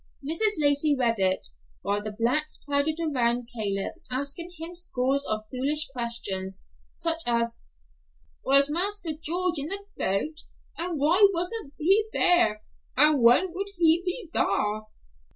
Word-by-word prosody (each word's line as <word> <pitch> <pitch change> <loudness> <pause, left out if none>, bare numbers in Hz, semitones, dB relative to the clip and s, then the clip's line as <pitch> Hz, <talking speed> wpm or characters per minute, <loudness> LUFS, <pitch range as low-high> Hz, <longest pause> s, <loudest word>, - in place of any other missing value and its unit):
Mrs. 420 +7 0
Lacey 290 0 +2
read 230 -4 +1
it, 185 - +1 0.3
while 205 +1 -1
the 215 0 -5
blacks 280 +7 0
crowded 285 +2 +1
around 245 -7 0
Claib 200 -3 -2 0.2
asking 280 +7 -4
him 325 +2 -7
scores 280 -6 0
of 215 0 -2
foolish 285 +4 +2
questions, 200 -7 -2 0.3
such 330 0 0
as, 235 -1 +1 0.9
"Was 275 +1 +4
Marster 370 +1 -2
George 350 +1 -1
in 280 - -2
the 395 +3 -2
boat? 300 +12 -2 0.4
And 340 -1 -3
why 350 +8 +5
wasn't 355 -3 -3
he 390 +7 +4
thar? 345 -13 +2 0.3
And 300 -1 +5
when 250 +10 +5
would 395 +2 -4
he 335 0 +4
be 365 +3 -3
thar?" 210 +2 0
290 Hz, 135 wpm, -26 LUFS, 235-340 Hz, 0.9 s, why